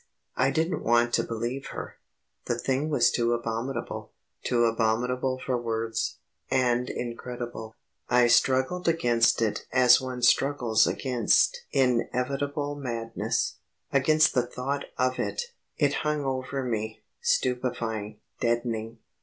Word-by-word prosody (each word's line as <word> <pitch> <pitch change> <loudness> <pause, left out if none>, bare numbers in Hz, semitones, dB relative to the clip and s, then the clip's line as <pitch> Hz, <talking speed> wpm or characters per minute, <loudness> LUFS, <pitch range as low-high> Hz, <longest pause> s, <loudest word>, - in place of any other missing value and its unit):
I 130 +2 +3
didn't 165 +4 0
want 120 +1 +3
to - - +3
believe 120 +4 -4
her. - - -7 0.5
The - - -1
thing 135 +3 -1
was 150 - +3
too 120 0 +1
abominable 115 +3 -4 0.3
too 120 -1 +2
abominable 125 +3 0
for 130 -1 -2
words, 115 -1 -2 0.3
and 125 -1 +1
incredible. 120 -2 -6 0.3
I 125 0 +5
struggled 130 +9 +2
against 120 -8 +3
it 110 - -2
as 125 0 +6
one 130 -1 -5
struggles 120 -4 +3
against 125 -5 +1
inevitable 135 +3 0
madness, 115 -5 -2 0.4
against 155 +3 +4
the 125 - +3
thought 135 +3 -3
of 130 0 0
it. 485 0 -3 0.2
It 145 -1 +2
hung 150 -1 -1
over 130 +1 -2
me, 110 -3 -3 0.2
stupefying, 120 - -1 0.2
deadening. 115 -1 -1
125 Hz, 120 wpm, -27 LUFS, 115-135 Hz, 0.5 s, as